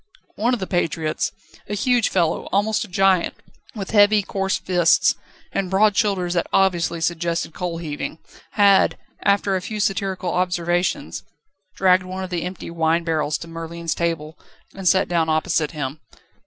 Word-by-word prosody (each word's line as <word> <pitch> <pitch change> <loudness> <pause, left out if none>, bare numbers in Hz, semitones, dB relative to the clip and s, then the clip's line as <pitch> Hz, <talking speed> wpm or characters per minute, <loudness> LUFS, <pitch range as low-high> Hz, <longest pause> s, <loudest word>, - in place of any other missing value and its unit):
One 240 +4 +1
of - - -7
the 190 - -3
patriots, 165 -3 -1 0.4
a 210 - -2
huge 245 +1 +2
fellow, 170 -4 0
almost 210 +3 +1
a - - -8
giant, 190 -1 +2 0.4
with 195 -3 -5
heavy, 205 -1 +5
coarse 195 0 -1
fists 175 -3 +3 0.4
and 190 -2 -2
broad 205 +2 +3
shoulders 195 -5 +1
that 175 - 0
obviously 175 -3 +1
suggested 170 0 -1
coal 175 -2 -4
heaving, 155 -1 -5 0.4
had, 200 -2 +4 0.2
after 200 -1 +2
a 185 - -1
few 215 +3 -5
satirical 190 -3 -1
observations, 175 - -1 0.5
dragged 185 -1 +4
one 185 +1 -6
of 185 - -7
the 175 -2 -1
empty 180 -1 -6
wine 165 0 +1
barrels 155 -2 0
to 170 - -9
Merlin's 165 0 -4
table, 165 -2 -3 0.3
and 195 -1 -4
sat 190 +2 +4
down 165 -2 +1
opposite 155 -1 +1
him. 145 -2 -5
180 Hz, 155 wpm, -22 LUFS, 165-195 Hz, 0.5 s, heavy